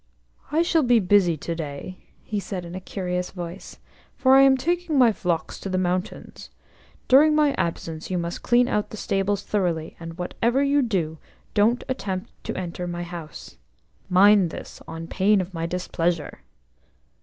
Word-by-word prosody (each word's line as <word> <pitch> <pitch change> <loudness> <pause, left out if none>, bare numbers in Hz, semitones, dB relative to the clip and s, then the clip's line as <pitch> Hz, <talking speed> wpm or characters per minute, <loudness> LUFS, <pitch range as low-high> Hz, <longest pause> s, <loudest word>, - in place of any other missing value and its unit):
"I 320 +3 +3
shall 335 -1 +2
be 245 -4 +4
busy 180 -4 +3
to 170 - -4
day," 160 +3 -6 0.2
he 210 - -3
said 190 -3 -5
in 170 - -9
a 185 - -6
curious 180 -1 -3
voice, 175 0 -8 0.4
"for 260 0 +4
I 270 - +8
am 270 -1 +6
taking 340 +2 -1
my 245 -3 +6
flocks 175 -5 -2
to 195 - -6
the 185 - 0
mountains. 185 +1 -3 0.6
During 300 +4 +6
my 300 -2 +3
absence 165 -6 -3
you 185 - -1
must 170 0 -4
clean 245 0 +3
out 210 -4 -1
the 215 - -8
stables 195 0 -1
thoroughly, 175 -6 -1
and, 165 0 -8
whatever 235 +9 0
you 280 +1 +3
do, 170 - -1 0.3
don't 225 +4 +3
attempt 195 -8 -4
to - - -4
enter 180 -1 -4
my 175 0 -4
house. 170 - -9 0.5
Mind 195 0 +6
this, - - -9
on 165 0 -6
pain 195 +4 +2
of 185 0 -4
my 165 -1 -3
displeasure." 170 -2 -2
185 Hz, 165 wpm, -24 LUFS, 170-240 Hz, 0.6 s, I